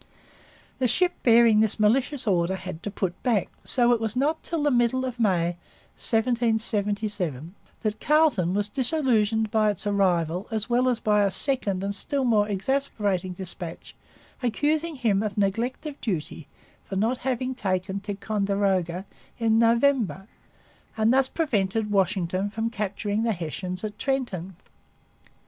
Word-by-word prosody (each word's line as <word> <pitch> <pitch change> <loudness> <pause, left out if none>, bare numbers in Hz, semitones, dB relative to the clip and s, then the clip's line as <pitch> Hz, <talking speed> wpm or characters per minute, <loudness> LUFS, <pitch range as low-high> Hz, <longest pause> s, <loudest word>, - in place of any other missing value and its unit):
The 255 - +2
ship 360 +9 +2
bearing 230 -2 +5
this 220 0 +2
malicious 250 +6 +2
order 185 -2 +1
had 185 -3 -7
to - - -4
put 190 -3 -3
back; 230 -7 +1
so 245 -2 +2
it 230 - 0
was 220 0 -2
not 295 +5 0
till 330 -3 -1
the 295 - +3
middle 245 +1 +2
of 250 -2 -5
May 175 -5 +1 0.4
1777 215 - 0 0.3
that 215 0 -1
Carleton 290 - +2
was 205 0 +1
disillusioned 230 -5 +1
by 215 -1 +3
its 205 0 -3
arrival 180 -3 +1
as 220 -3 -1
well 245 +1 +2
as 245 - 0
by 210 -1 +2
a 200 - +3
second 200 -5 -1
and 200 0 -2
still 275 +7 0
more 215 -4 +2
exasperating 200 -4 -1
dispatch 175 -2 -4 0.5
accusing 300 +7 0
him 220 -7 +1
of 215 -2 -3
neglect 225 +8 -1
of 295 -2 -7
duty 165 - -4 0.4
for 195 - -7
not 225 +6 0
having 260 0 -2
taken 190 -4 -2
Ticonderoga 195 -3 -1 0.3
in 225 -1 +2
November 230 - +2 0.7
and 220 +2 +3
thus 265 0 +4
prevented 220 - -1
Washington 190 0 0
from 225 +2 -3
capturing 210 -1 -2
the 230 -1 +1
Hessians 180 +2 -5
at 210 -1 -5
Trenton. 200 - -2
215 Hz, 145 wpm, -25 LUFS, 195-245 Hz, 0.7 s, bearing